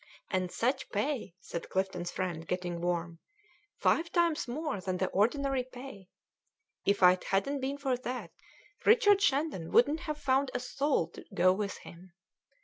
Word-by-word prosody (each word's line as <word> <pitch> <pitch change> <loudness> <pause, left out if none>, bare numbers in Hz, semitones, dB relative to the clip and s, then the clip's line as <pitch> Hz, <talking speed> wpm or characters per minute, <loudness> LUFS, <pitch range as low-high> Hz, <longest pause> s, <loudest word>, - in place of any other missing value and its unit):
"And 185 -2 0
such 250 +4 -1
pay," 215 - -2
said 170 - -6
Clifton's 185 -2 -1
friend, 175 -3 -4
getting 175 -1 -3
warm 170 -1 -2 0.6
"five 335 +1 +2
times 340 -5 +2
more 275 - -3
than 185 -1 -2
the 190 0 0
ordinary 265 +5 +1
pay. 250 -6 -11 0.8
If 200 -1 +2
it 180 0 +6
hadn't 275 +9 0
been 270 +2 -2
for 270 -3 0
that, 245 -8 -5 0.5
Richard 415 -3 +5
Shandon 275 - +1
wouldn't 290 +6 +4
have 305 -2 -4
found 275 -1 +1
a - - +1
soul 255 - 0
to - - -12
go 185 +1 +5
with 200 +1 -3
him. 175 +1 -13
230 Hz, 150 wpm, -31 LUFS, 180-280 Hz, 0.8 s, it